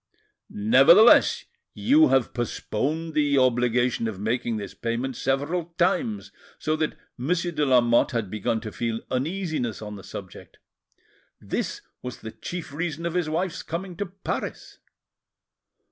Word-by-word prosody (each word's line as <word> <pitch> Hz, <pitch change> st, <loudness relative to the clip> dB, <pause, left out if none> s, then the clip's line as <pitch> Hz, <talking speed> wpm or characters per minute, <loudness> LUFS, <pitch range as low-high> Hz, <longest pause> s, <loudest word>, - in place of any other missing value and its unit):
"Nevertheless, 135 Hz, -, +6 dB, 0.3 s
you 305 Hz, +5 st, +5 dB
have 135 Hz, -3 st, +2 dB
postponed 145 Hz, +6 st, -2 dB
the 145 Hz, -2 st, +2 dB
obligation 125 Hz, -2 st, +2 dB
of 105 Hz, -4 st, -5 dB
making 115 Hz, +2 st, -1 dB
this 100 Hz, -2 st, -6 dB
payment 120 Hz, +3 st, -3 dB
several 160 Hz, +7 st, -1 dB
times, 205 Hz, +4 st, 0 dB, 0.3 s
so 155 Hz, -, -1 dB
that 155 Hz, -1 st, -2 dB, 0.2 s
Monsieur 175 Hz, +6 st, 0 dB
de 150 Hz, -2 st, -1 dB
Lamotte 120 Hz, -2 st, +4 dB
had 115 Hz, -6 st, -3 dB
begun 110 Hz, +1 st, -1 dB
to 110 Hz, -, -6 dB
feel 115 Hz, 0 st, -3 dB
uneasiness 155 Hz, -, -2 dB
on 105 Hz, -1 st, -7 dB
the 95 Hz, -, -11 dB
subject. 95 Hz, -3 st, -10 dB, 0.8 s
This -, -, -3 dB, 0.2 s
was 125 Hz, -2 st, -7 dB
the 110 Hz, -, -7 dB
chief 170 Hz, +1 st, -7 dB
reason 165 Hz, +1 st, -3 dB
of 170 Hz, -, -2 dB
his 175 Hz, -3 st, 0 dB
wife's 170 Hz, +2 st, -2 dB
coming 175 Hz, +2 st, -5 dB
to 205 Hz, -, -2 dB
Paris." 190 Hz, +2 st, -5 dB
135 Hz, 135 wpm, -25 LUFS, 115-170 Hz, 0.8 s, Nevertheless